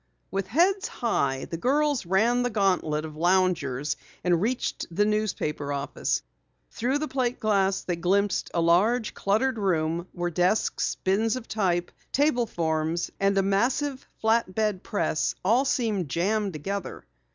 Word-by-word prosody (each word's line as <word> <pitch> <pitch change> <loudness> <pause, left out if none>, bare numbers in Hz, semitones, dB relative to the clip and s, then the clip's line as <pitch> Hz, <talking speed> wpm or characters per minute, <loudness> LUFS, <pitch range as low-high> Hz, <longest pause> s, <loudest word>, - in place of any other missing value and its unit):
With 195 -1 -2
heads 360 - +2
high 140 - -1
the 165 - -5
girls 280 - +1
ran 225 +7 +3
the 245 - +1
gantlet 180 -8 +1
of 155 -1 -8
loungers 160 -5 +1 0.3
and 175 -2 +2
reached 240 +4 -1
the 205 +5 +1
newspaper 200 -9 -1
office. 140 0 -2 0.5
Through 255 +5 0
the 305 +1 -2
plate 255 -3 -1
glass 195 -3 +1
they 175 -2 -2
glimpsed 195 +3 +1
a 170 - +2
large, 210 +8 +3
cluttered 225 +5 0
room 170 -3 0
where 175 -1 -2
desks, 180 +6 +1
bins 215 +5 +2
of 255 -2 -7
type, 180 -5 0 0.2
table 260 -4 +2
forms 160 -1 -1
and 195 0 +2
a 195 - +4
massive 255 +8 0
flat 220 -3 +2
bed 210 -4 0
press 165 -6 -1
all 235 +7 +4
seemed 220 - 0
jammed 200 +5 0
together. 195 +5 -5
195 Hz, 145 wpm, -26 LUFS, 170-230 Hz, 0.5 s, a